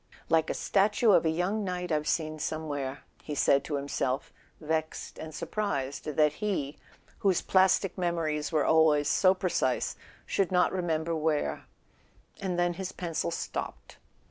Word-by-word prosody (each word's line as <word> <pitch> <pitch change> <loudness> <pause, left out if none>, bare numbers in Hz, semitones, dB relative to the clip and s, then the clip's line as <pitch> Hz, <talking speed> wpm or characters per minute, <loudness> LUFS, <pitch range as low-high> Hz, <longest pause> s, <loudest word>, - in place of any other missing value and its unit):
"Like 160 -1 +3
a - - -1
statue 210 +3 +3
of 175 - +4
a - - +3
young 180 +6 0
knight 180 -2 -3
I've 150 -1 0
seen 155 -1 -1
some¬ 155 +2 -3
where," 140 -2 -4 0.2
he 150 - -5
said 140 0 +3
to 150 - -2
himself, 140 -1 -2 0.3
vexed 155 0 -3
and 160 - -7
surprised 145 -7 -3
that 150 0 +2
he, 165 -9 -2 0.4
whose 190 -3 +2
plastic 190 0 +3
memories 165 -4 -1
were 155 -3 +2
always 155 -2 +4
so 185 0 +4
precise, 170 -9 0 0.3
should 195 -2 0
not 180 -1 +3
remember 165 -2 -1
where; 150 - -1 0.7
and 185 -3 -2
then 175 0 +2
his 190 +1 -5
pencil 165 - -3
stopped. - - -5
160 Hz, 150 wpm, -29 LUFS, 150-180 Hz, 0.7 s, of